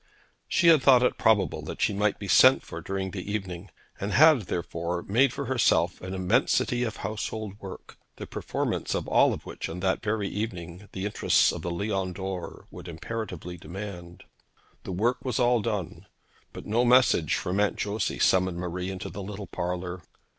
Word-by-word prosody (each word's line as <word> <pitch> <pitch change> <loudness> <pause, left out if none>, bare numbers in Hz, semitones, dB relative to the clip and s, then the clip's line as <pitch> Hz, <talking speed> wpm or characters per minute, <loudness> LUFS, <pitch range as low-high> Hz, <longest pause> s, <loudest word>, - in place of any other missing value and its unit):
She 170 - +4
had 160 -4 +6
thought 130 -2 +6
it 125 - +1
probable 110 -3 +2
that - - -7
she - - +2
might 105 +1 +1
be 100 - -7
sent 130 +7 +6
for 85 - -8
during 95 +1 -3
the 100 +1 -5
evening, 95 -2 -4 0.3
and 100 +1 -3
had, 155 -4 +7
therefore, 85 0 -3
made 120 +6 +3
for 140 +2 -4
herself 100 -10 +2
an 95 +1 -5
immensity 95 +6 +1
of 115 -3 -2
household 110 -1 -4
work, 95 -3 -10 0.2
the - - -7
performance - - -3
of - - -3
all - - +4
which - - -7
on 85 +2 -6
that 95 0 0
very 105 -2 -1
evening 95 -3 -5
the 95 +1 -4
interests 105 - +3
of - - -6
the 85 - -3
Lion 95 +1 -2
d'Or 95 -2 -6
would - - -10
imperatively 90 0 -6
demand. 90 -1 -8 0.6
The - - -5
work 115 +7 0
was 125 -4 -2
all 120 -2 +3
done, 105 -7 -4 0.4
but - - -9
no 115 +3 +2
message 120 - +4
from 90 +3 -2
Aunt 105 -1 +2
Josey 105 0 -2
summoned 95 -1 +2
Marie 90 +1 -4
into 95 -1 -5
the 100 - -6
little 100 +1 -6
parlour. 90 0 -4
100 Hz, 175 wpm, -27 LUFS, 90-110 Hz, 0.6 s, had